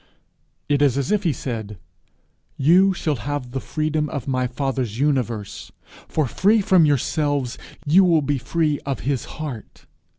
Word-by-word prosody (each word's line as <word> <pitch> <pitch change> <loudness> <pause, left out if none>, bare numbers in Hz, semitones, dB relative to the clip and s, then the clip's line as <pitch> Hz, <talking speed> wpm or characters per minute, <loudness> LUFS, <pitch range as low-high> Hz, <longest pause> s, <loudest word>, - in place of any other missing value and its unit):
It 145 -1 +1
is 140 -3 +3
as 140 -2 -1
if 210 -1 +2
he 175 -5 +1
said, 110 -6 -5 0.8
'You 180 +8 +5
shall 155 -6 -1
have 135 +2 -4
the 135 - -3
freedom 155 +2 -2
of 140 -4 -5
my 130 -2 0
father's 125 -3 -3
universe; 120 -7 -2 0.4
for, 155 - 0
free 205 - +3
from 185 -4 +4
yourselves, 145 -2 0 0.3
you 170 +6 +5
will 165 -4 +3
be 140 -1 0
free 155 +2 0
of 135 -2 -4
his 135 -2 -1
heart. 145 -8 -7
145 Hz, 155 wpm, -22 LUFS, 125-155 Hz, 0.8 s, You